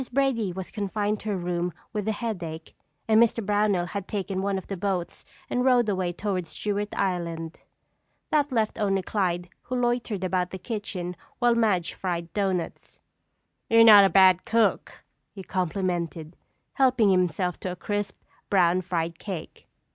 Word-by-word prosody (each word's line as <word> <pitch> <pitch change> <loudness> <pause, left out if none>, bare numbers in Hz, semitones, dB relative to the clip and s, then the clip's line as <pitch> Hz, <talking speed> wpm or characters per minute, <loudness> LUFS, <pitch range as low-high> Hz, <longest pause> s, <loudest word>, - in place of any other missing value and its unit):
Brady 250 -7 +1
was 185 +1 -7
confined 205 0 -2
to 215 - -5
her 200 - 0
room 175 0 -2 0.2
with 210 -1 -3
a - - +2
headache 175 -8 -5 0.3
and 220 0 +5
Mr. 230 -2 +2
Brownell 205 -3 +2
had 195 +2 -5
taken 195 -2 -3
one 195 0 0
of 190 - -6
the 195 - -5
boats 185 -2 -3 0.2
and 250 - 0
rowed 250 -3 +4
away 185 -3 0
toward 185 -1 -3
Stewart 205 +4 -2
Island. 170 -3 -2 0.7
That 295 -2 +2
left 225 -2 0
only 195 -2 +1
Clyde 180 -4 -1 0.2
who 255 - -3
loitered 240 -5 -1
about 180 -1 0
the 190 - -6
kitchen 185 -4 -5 0.2
while 240 -1 +3
Madge 210 -7 +1
fried 170 -2 -4
doughnuts. 190 -4 -3 0.7
"You're 230 0 +7
not 210 -3 +10
a 195 - +5
bad 185 -2 +5
cook," 230 0 0 0.3
he 195 - -8
complimented, 175 -3 -2 0.4
helping 255 -6 +3
himself 180 -1 0
to 185 - -4
a - - -5
crisp, 205 +1 -3 0.3
brown 180 -2 +3
fried 170 -2 -3
cake. 185 -6 -7
195 Hz, 155 wpm, -26 LUFS, 180-215 Hz, 0.7 s, not